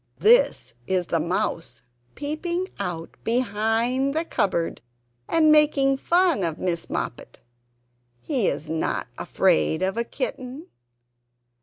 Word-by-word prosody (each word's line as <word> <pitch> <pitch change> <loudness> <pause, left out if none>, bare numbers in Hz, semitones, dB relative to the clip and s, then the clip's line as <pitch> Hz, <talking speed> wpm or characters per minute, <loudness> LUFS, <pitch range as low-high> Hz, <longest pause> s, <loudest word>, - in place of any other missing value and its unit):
This 475 +3 +4
is 185 -2 +1
the 165 - 0
Mouse 165 0 -2 0.3
peeping 340 +5 -3
out 175 -4 -4
behind 235 +4 0
the 320 +1 0
cupboard 175 - -1 0.5
and 315 -2 +4
making 285 -3 +4
fun 345 - +2
of 165 -2 -1
Miss 175 -2 -2
Moppet. - - -5 0.8
He 255 - 0
is 145 +2 -2
not 160 +1 -1
afraid 80 - +1
of 190 +3 -1
a 235 - +1
kitten. 270 - -5
240 Hz, 115 wpm, -24 LUFS, -, 0.8 s, This